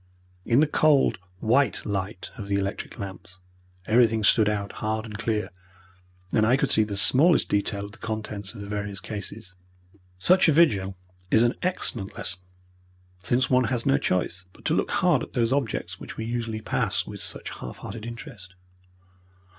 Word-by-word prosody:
In 120 +4 +4
the - - +5
cold 150 -9 +3 0.2
white 130 +5 +2
light 95 -2 -4
of 105 -5 -7
the 100 - 0
electric 100 0 -3
lamps 90 -2 -8 0.5
everything 115 0 +3
stood 105 +1 +5
out 100 -1 -2
hard 110 +1 -1
and 105 -2 -8
clear, 110 -1 -2 0.8
and 110 - +3
I 120 +4 +4
could - - +1
see 110 - +5
the 105 -2 -4
smallest 145 - +6
detail 100 0 0
of 100 - -10
the 110 - -16
contents 110 -3 -5
of 100 - -8
the 100 - -7
various 100 -1 -4
cases. 100 -1 -6 0.6
Such 185 - +4
a - - +4
vigil 100 - +3 0.3
is 110 - +5
an 120 +1 +3
excellent 120 - -1
lesson, 90 - -4 0.8
since 125 +6 +1
one 125 -1 +4
has 120 0 -2
no 140 +1 +3
choice 90 -5 -1
but - - -20
to - - +2
look - - 0
hard - - +2
at - - -7
those 120 +1 +1
objects 135 -6 -2
which - - -9
we 110 - -4
usually 115 -2 -3
pass - - 0
with - - -8
such - - -4
half 60 - -8
hearted 110 +2 -7
interest. 115 - -9
110 Hz, 175 wpm, -25 LUFS, 100-120 Hz, 0.8 s, smallest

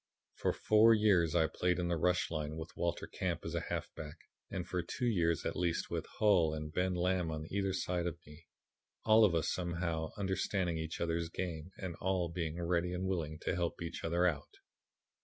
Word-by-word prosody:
"For - - 0
four 110 +1 +5
years 95 -6 +3
I 80 -2 +5
played 90 +2 0
in 90 -1 -1
the 85 - +1
rush 90 +2 +1
line 75 -1 -3
with 80 +1 -7
Walter 85 -1 -1
Camp - - -2
as - - -4
a - - +1
halfback, 75 -1 -5 0.3
and 90 -2 -4
for 90 0 -1
two 105 +8 -3
years, 85 -8 +2
at - - -1
least, 85 -2 -1
with - - -2
Hull 90 -7 +4
and 75 0 -5
Ben 90 0 +1
Lamb 90 -1 +1
on 80 0 -4
either 100 -1 0
side 90 -2 -1
of 85 - -3
me, 75 +3 -15 0.6
all 110 0 +7
of 95 -5 +4
us 80 - +1
somehow 85 -2 -2
understanding 95 -3 0
each 80 0 -4
other's 85 0 -1
game 85 -2 -4
and 90 -2 -4
all 95 -2 +1
being 85 -1 -3
ready 85 +1 0
and 90 +1 -2
willing 80 -5 -2
to - - -1
help 85 -1 -1
each 85 0 -5
other 85 +2 +2
out. 75 -5 -1
85 Hz, 195 wpm, -34 LUFS, 80-95 Hz, 0.6 s, all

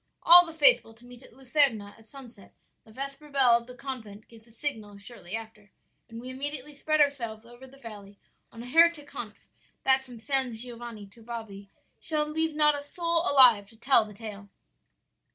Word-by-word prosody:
"'All 350 +1 +8
the - - -8
faithful 285 -7 +3
to 235 +2 -18
meet 245 0 -14
at - - -17
Luserna 255 -5 +1
at 225 0 -21
sunset; 245 -7 -13 0.3
the 220 - -18
vesper 275 +5 -8
bell 270 -3 +3
of 235 0 +2
the 250 - -12
convent 230 -5 -9
gives 225 -1 -18
the 235 - -22
signal 220 -5 -6
shortly 200 -2 -8
after, 220 -2 -10 0.4
and 230 0 -9
we 255 +2 -8
immediately 290 +2 -5
spread 310 +2 -1
ourselves 235 -7 0
over 240 +2 -15
the 270 +1 -18
valley 205 -5 -12 0.3
on 230 0 -10
a - - -10
heretic 325 +2 +3
hunt - - -8 0.5
that 265 0 +3
from 250 -2 -13
San 260 +2 -1
Giovanni 235 -2 -9
to 200 +4 -20
Bobbi 220 -4 -9 0.3
shall 305 -2 -2
leave 320 +1 -2
not 300 -1 +4
a 290 - -5
soul 335 +3 -2
alive 240 -7 +5
to 225 - -20
tell 240 0 +3
the 210 -1 -12
tale.' 205 -2 -10
245 Hz, 190 wpm, -27 LUFS, 220-280 Hz, 0.5 s, All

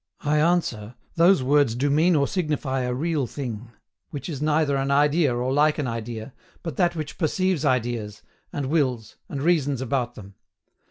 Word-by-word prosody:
I 150 +1 +1
answer, 140 -10 0 0.2
those 170 -3 +4
words 140 -3 +3
do 140 +3 0
mean 165 +4 +4
or 140 -2 +2
signify 150 -7 -1
a 125 0 -1
real 150 -2 -1
thing, 120 -4 -6 0.4
which 145 +2 -6
is 145 -4 -5
neither 150 -1 +2
an 135 0 -1
idea 145 +1 +3
nor 125 +2 -1
like 150 +2 +3
an 150 - -1
idea, 115 0 -5 0.3
but 165 -6 -5
that 175 -1 +2
which 155 -2 -6
perceives 185 -1 0
ideas, 120 -5 -1 0.3
and 145 - -3
wills, 130 -7 -1
and 140 -1 -4
reasons 145 -6 +2
about 125 -2 -2
them. 100 -1 -11
140 Hz, 170 wpm, -24 LUFS, 125-155 Hz, 0.4 s, those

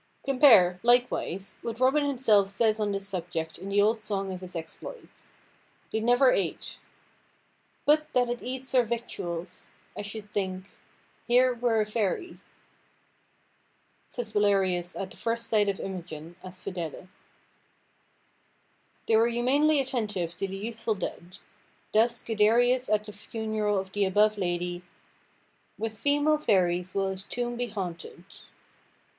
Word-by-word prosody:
Compare, 235 -10 +6
likewise, 240 -6 +1
what 230 0 -5
Robin 265 +4 +4
himself 240 -8 +3
says 215 +2 +1
on 210 -1 0
this 195 0 -3
subject 170 -4 -4
in 195 - -7
the 200 +1 +2
old 220 +2 +3
song 195 -3 -3
of 185 - -7
his 185 -1 -9
exploits. 165 - -9 0.6
They 220 - 0
never 245 +3 +4
ate— 185 -4 -2 1.1
"But 305 +1 +3
that 250 -1 +3
it 240 0 -3
eats 260 +1 -5
our 255 - +6
victuals, 190 -7 -5 0.3
I - - -4
should 205 0 -8
think, 190 -1 -3 0.6
Here 250 +1 +4
were 235 -2 +1
a - - +1
fairy," 215 - -2 1.7
says 240 -3 -5
Belarius 195 -4 +1
at 190 -1 -4
the - - -14
first 230 0 -2
sight 210 -3 +2
of 195 - -2
Imogen, 175 -3 -7
as 185 0 -10
Fidele. 180 -2 -5 2.0
They 225 - +4
were 225 +1 +5
humanely 275 +6 +3
attentive 210 -10 -2
to 195 - -2
the 195 0 -6
youthful 225 +1 -3
dead. 180 0 -6 0.6
Thus 230 +2 +2
Guiderius 235 +4 +3
at 210 0 +2
the 210 - -9
funeral 215 0 -2
of 190 0 -3
the 205 0 +1
above 210 +2 +3
lady— 175 -1 -2 1.0
"With 220 -1 -4
female 290 +1 +2
fairies 180 -7 +1
will 195 -1 +1
his 190 0 -5
tomb 240 +2 -3
be 245 0 -2
haunted." 180 -5 -6
210 Hz, 140 wpm, -28 LUFS, 190-240 Hz, 2.0 s, Compare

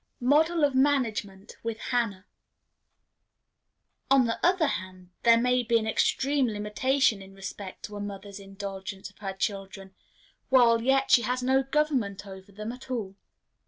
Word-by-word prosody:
Mode 290 +6 +4
of 285 -2 +3
Management 225 -8 0
with 230 -1 -4
Hannah. 220 -6 -2 1.8
On 270 -2 +5
the 230 -1 -3
other 355 -1 +3
hand, 185 - -5
there 230 -1 +5
may 250 +1 +2
be 235 -1 +2
an 220 - -2
extreme 270 +4 +1
limitation 215 +2 +1
in 195 0 -13
respect 195 0 -8
to 210 - -7
a - - -6
mother's 200 0 -7
indulgence 195 0 -7
of - - -28
her 195 -2 -4
children, 195 -1 -4 0.6
while 235 -3 +5
yet 270 +2 +2
she 240 - +7
has 250 +1 -2
no 265 +1 +3
government 265 -9 -1
over 190 0 -11
them 215 +3 -6
at 255 +2 -12
all. 220 -7 -3
225 Hz, 150 wpm, -27 LUFS, 195-260 Hz, 1.8 s, she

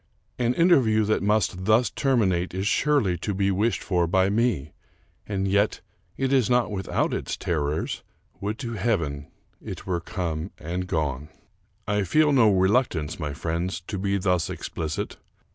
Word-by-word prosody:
An 120 0 +1
inter 170 -2 +6
view 110 -3 +2
that 110 - +1
must 100 -3 +1
thus 110 +4 +3
terminate 95 -11 +1
is 95 +1 -2
surely 105 - +2
to 100 +2 -2
be 100 0 +1
wished 105 +5 0
for 90 -4 +1
by 95 +2 +2
me; 105 - 0 0.6
and 100 -2 -1
yet 100 +2 +2 0.4
it 135 0 0
is 130 -4 +3
not 125 -3 +2
without 95 -2 -1
its - - -3
terrors. 75 -2 -2 0.4
Would 105 +2 -3
to 120 -3 -5
heaven 85 -10 -1 0.4
it - - -7
were 90 -2 -1
come 85 -1 -3
and 90 +3 -4
gone! 75 -3 -2 0.6
I 105 0 +1
feel 150 - +3
no 125 -6 +5
reluctance, 95 - +1
my 75 -3 -3
friends, 85 +3 -2
to 95 +2 -5
be 100 +1 0
thus 90 -4 +1
explicit. 80 -2 -4
95 Hz, 160 wpm, -25 LUFS, 85-110 Hz, 0.6 s, inter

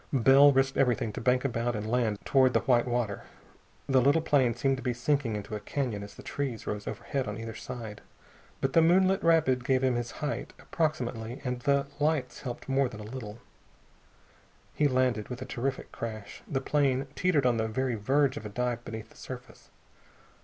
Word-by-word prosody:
Bell 135 +2 +7
risked 135 0 +1
everything 125 -4 +1
to - - -5
bank 125 +2 +2
about 120 -2 -1
and 105 0 -3
land 115 -3 +1
toward 130 -2 +4
the - - +4
white 125 -2 +3
water. 120 -4 -1 0.7
The 135 -2 +4
little 145 +5 +3
plane 130 -7 +3
seemed 135 -1 +1
to - - -7
be 125 -1 -1
sinking 125 -2 0
into 105 +1 -6
a 105 - -2
canyon 115 -1 -3
as 100 0 -9
the - - -12
trees 135 -6 -4
rose 105 0 -4
overhead 135 -5 -3
on 105 0 -4
either 115 0 -6
side. 115 -2 -7 0.6
But 135 0 0
the 165 - +6
moonlit 185 +3 +4
rapid 155 -7 +3
gave 130 +1 +2
him 130 -1 +3
his 120 -1 -2
height, 150 -1 -4
approximately, 125 -7 -2
and 125 -2 -2
the 140 +1 +2
lights 150 -3 0
helped 120 -3 -6
more 135 -1 +2
than 110 -3 -10
a - - -7
little. 110 -1 -7 1.4
He 150 - +3
landed 125 -5 +1
with 125 -1 -5
a 130 - -5
terrific 130 +2 -3
crash. 110 -3 -7
The 135 -2 -1
plane 135 -2 +1
teetered 160 -7 +2
on 120 -2 +3
the 110 0 0
very 130 +3 -1
verge 135 +6 +1
of 130 - -7
a - - -8
dive 120 +2 -2
beneath 110 -1 -7
the - - -19
surface. 125 -2 -10
125 Hz, 195 wpm, -29 LUFS, 115-140 Hz, 1.4 s, Bell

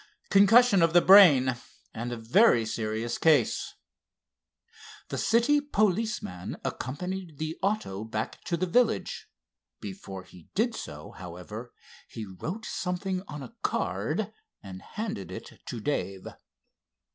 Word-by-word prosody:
"Concussion 205 +1 +6
of 165 0 +3
the 175 - +7
brain, 145 -11 +7 0.4
and 120 +2 -4
a 120 - -4
very 120 - +4
serious 110 +1 -3
case." 160 -3 +2 1.3
The - - -3
city 240 +6 +3
policeman 215 - -1
accompanied 180 +4 -4
the 155 +2 -3
auto 195 - -1
back 110 -1 -5
to 170 - -1
the 185 - 0
village. 240 +8 +1 0.5
Before 100 - -8
he 90 -2 -17
did 230 +3 +1
so, 75 - -8
however, 95 +7 -9 0.4
he 110 - -7
wrote 160 - -6
something 185 0 -2
on 145 -1 -7
a - - -11
card - - -1 0.3
and 95 -2 -9
handed 200 - -5
it - - -9
to 120 - -5
Dave. 100 -7 -3
155 Hz, 120 wpm, -28 LUFS, -, 1.3 s, the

